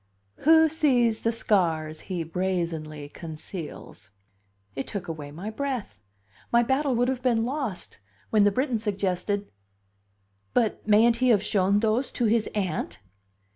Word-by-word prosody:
"Who 320 +1 +6
sees 255 -8 +2
the 230 - +1
scars 165 -8 0
he 180 -3 -2
brazenly 165 -4 -3
conceals?" 155 - -8 0.7
It 135 - -4
took 200 -3 -5
away 155 -3 -6
my 175 +9 -6
breath; 245 - -4 0.5
my 235 0 +5
battle 265 +2 +1
would 245 +1 +2
have 260 -1 -1
been 235 -3 +2
lost, 255 - -4 0.3
when 215 -2 +5
the 205 - +4
Briton 255 0 0
suggested: 200 -1 -2 1.0
"But 220 -2 +1
mayn't 225 +2 +5
he 255 +1 +2
have 210 -4 +4
shown 200 -1 +2
those 225 +4 +1
to 240 - 0
his 220 0 +2
Aunt?" 195 -4 -2
210 Hz, 135 wpm, -26 LUFS, 175-240 Hz, 1.0 s, Who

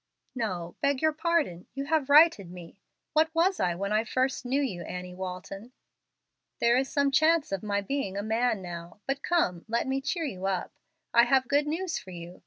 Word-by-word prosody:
"No, 185 -8 -4
beg 280 -1 +2
your 315 0 +3
pardon, 310 - 0
you 275 0 -3
have 300 -2 0
righted 290 - +6
me. 175 +1 -11 0.3
What 315 +1 +4
was 360 +3 +2
I 175 -1 +1
when 200 +3 -2
I 215 +1 +3
first 260 +3 -1
knew 270 +3 +1
you, 235 -12 -2
Annie 180 +1 -6
Walton? 190 +5 -7 0.9
There 235 0 +4
is 265 +1 +1
some 280 -1 +2
chance 315 0 +3
of 195 -2 -2
my 200 -1 -1
being 200 -2 -3
a 200 - -2
man 220 -1 0
now. 175 +1 -8
But 275 +1 -2
come, 235 - 0
let 230 +1 0
me 270 +1 -1
cheer 330 +4 -2
you 190 -8 -4
up. 185 -2 -2 0.4
I 235 0 +7
have 260 +1 +3
good 290 +2 +2
news 330 +3 -2
for 190 - -13
you. 175 0 -9
235 Hz, 195 wpm, -28 LUFS, 185-285 Hz, 0.9 s, I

